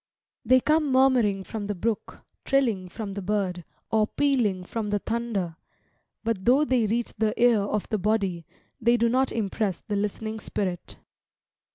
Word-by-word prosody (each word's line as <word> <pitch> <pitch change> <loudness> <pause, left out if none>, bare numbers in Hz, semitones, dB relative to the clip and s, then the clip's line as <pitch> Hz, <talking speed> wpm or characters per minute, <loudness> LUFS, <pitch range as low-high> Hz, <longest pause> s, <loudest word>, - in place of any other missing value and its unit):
They 255 +2 +5
come 305 +1 +2
murmuring 250 -7 +3
from 205 +1 -5
the 205 - -2
brook, 220 +4 -3 0.2
trilling 230 -10 +1
from 205 +1 -6
the 200 - -4
bird, 190 -3 -1 0.3
or 215 -1 +3
pealing 235 -11 +1
from 215 +3 -4
the 205 - +1
thunder; 205 -7 -3 0.7
but 225 -4 -1
though 265 +7 +4
they 250 -6 +2
reach 235 +3 -1
the 215 0 0
ear 240 -2 +5
of 205 +1 -2
the 215 - 0
body, 195 -5 0 0.3
they 235 +1 +3
do 235 0 +3
not 260 +2 +2
impress 205 -3 -1
the 210 - -4
listening 215 +2 -3
spirit. 185 -4 -4
215 Hz, 160 wpm, -26 LUFS, 200-240 Hz, 0.7 s, They